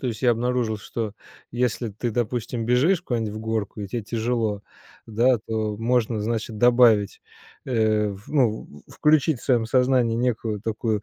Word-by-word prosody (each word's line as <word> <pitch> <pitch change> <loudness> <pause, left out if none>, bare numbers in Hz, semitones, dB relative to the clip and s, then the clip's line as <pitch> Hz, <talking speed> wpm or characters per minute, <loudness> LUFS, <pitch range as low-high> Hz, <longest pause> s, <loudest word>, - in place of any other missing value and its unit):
То - - -3
есть 110 +2 -5
я 125 - +5
обнаружил 120 -1 -1
что 110 0 -5 0.4
если 120 -1 -1
ты 115 +4 -3
допустим 120 0 -2
бежишь 150 +9 +3
куда-нибудь 115 - -2
в - - -5
горку 110 -1 -3
и - - -4
те 115 +3 -3
тяжело, 110 -1 -2 0.4
да, 120 +3 +2
то 110 -2 -2
можно 115 -1 0
значит 110 0 -3
добавить, 120 -4 +4 0.4
э, 110 -4 +1
в 100 +1 -9
ну, 125 -7 +1 0.2
включить 150 -3 +2
в - - -12
своем 120 -4 +2
сознании 125 -2 +2
некую 115 -3 -1
такую 110 -1 -2
115 Hz, 160 wpm, -24 LUFS, 110-125 Hz, 0.4 s, я